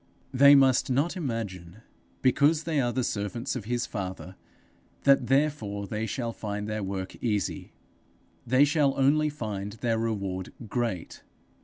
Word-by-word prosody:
They 140 +2 +8
must 135 -2 +4
not 140 +8 +1
imagine, 110 - -5 0.4
because 145 +5 +3
they 155 -4 0
are 120 -1 0
the 125 +2 -1
servants 115 +5 -3
of 115 -5 -5
his 120 +2 -1
father, 95 -2 -6 0.7
that 140 -3 +4
therefore 135 -8 0
they 110 +3 -3
shall 115 +1 -3
find 105 -1 -4
their 110 0 -3
work 95 -1 -4
easy; 105 -7 -2 0.8
they 130 +4 +5
shall 145 -2 +2
only 150 +3 +3
find 105 -8 -5
the 115 +1 -1
reward 100 -5 -3
great. 115 -7 -3
115 Hz, 140 wpm, -27 LUFS, 100-135 Hz, 0.8 s, They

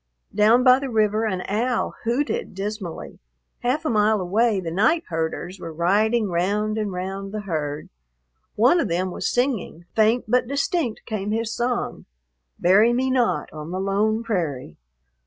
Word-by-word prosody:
Down 220 +4 +4
by 255 0 +6
the 275 -1 -4
river 215 -1 +1
an 185 -3 -2
owl 235 +4 0
hooted 245 -2 -1
dismally. 195 -3 -6 0.4
Half 260 +6 -1
a - - +1
mile 215 0 +3
away 205 +4 +1
the 170 -3 -4
night 220 - +2
herders 165 +3 -3
were 165 -2 -7
riding 205 +7 +2
round 205 +5 0
and 210 -2 -2
round 190 +2 -5
the 215 0 -4
herd. 155 -6 -3 0.7
One 250 +11 +4
of 270 - 0
them 180 +1 -1
was - - -2
singing, 245 - -1
faint 225 +3 +3
but 245 +2 +2
distinct 280 -2 -1
came 210 -3 -3
his 225 +1 -1
song: 240 0 -2 0.5
"Bury 205 +7 +4
me 260 +2 +1
not 250 -3 0
on 155 0 -7
the 185 +2 -3
lone 210 +3 0
prairie." 155 - -3
215 Hz, 155 wpm, -23 LUFS, 185-235 Hz, 0.7 s, by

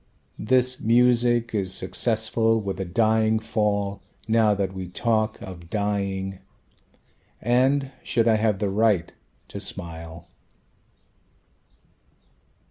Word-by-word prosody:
This 125 +3 +2
music 120 0 +3
is 95 -3 -1
successful 115 0 +1
with 100 -3 -4
a 95 - -2
"dying 110 +3 +2
fall" 105 -2 -1 0.3
Now 110 -2 +3
that 95 -1 -2
we 95 -2 -6
talk 110 +2 0
of 85 -3 -10
dying 100 -2 -2 1.0
And 130 +4 +2
should 115 -1 0
I 110 -1 +4
have 110 -2 +1
the 100 0 -1
right 100 -5 +1 0.4
to - - -7
smile? 85 -2 -6
110 Hz, 105 wpm, -24 LUFS, 95-115 Hz, 1.0 s, I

